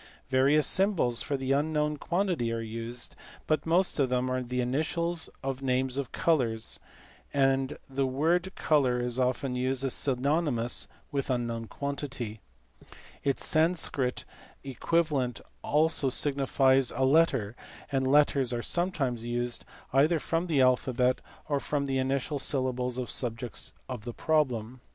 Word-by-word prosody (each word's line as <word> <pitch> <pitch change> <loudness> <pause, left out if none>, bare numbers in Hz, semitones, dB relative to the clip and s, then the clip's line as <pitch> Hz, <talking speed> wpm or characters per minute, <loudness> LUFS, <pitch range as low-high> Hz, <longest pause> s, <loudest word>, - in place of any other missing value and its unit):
Various 135 +3 +4
symbols 185 - +2
for 140 - -2
the 135 0 -2
unknown 150 +1 +1
quantity 170 -8 -1
are 115 - -2
used, 115 +2 -6 0.3
but 155 0 0
most 175 0 +2
of 135 -3 +2
them 125 0 0
are 130 0 0
the 125 0 -3
initials 160 +6 -1
of 135 0 -3
names 130 -1 0
of 135 -4 -4
colours, 115 -9 0 0.6
and 135 0 +2
the 135 0 -1
word 165 +8 +1
colour 130 -5 +2
is 120 +1 -2
often 130 +1 0
used 130 +1 -1
as 135 - 0
synonymous 135 -2 0 0.2
with 140 -1 -2
unknown 120 -2 -2
quantity; 140 -6 -4 0.8
its 140 -1 0
Sanscrit 155 -6 +2 0.4
equivalent 140 -2 0 0.2
also 150 -2 +3
signifies 135 -1 +3
a 130 +2 0
letter, 135 -7 +3 0.4
and 135 -1 +1
letters 140 -2 +3
are 120 -1 -2
sometimes 145 -10 -1
used 120 0 -3 0.3
either 150 +5 +4
from 165 +3 -1
the 150 -5 +2
alphabet 125 0 +2 0.3
or 145 -2 0
from 140 0 -1
the 135 -1 -1
initial 135 +2 -1
syllables 130 -2 0
of 125 -1 -3
subjects 120 -1 -3 0.2
of 125 -5 -6
the 120 - -5
problem. 130 -6 0
135 Hz, 135 wpm, -29 LUFS, 125-150 Hz, 0.8 s, Various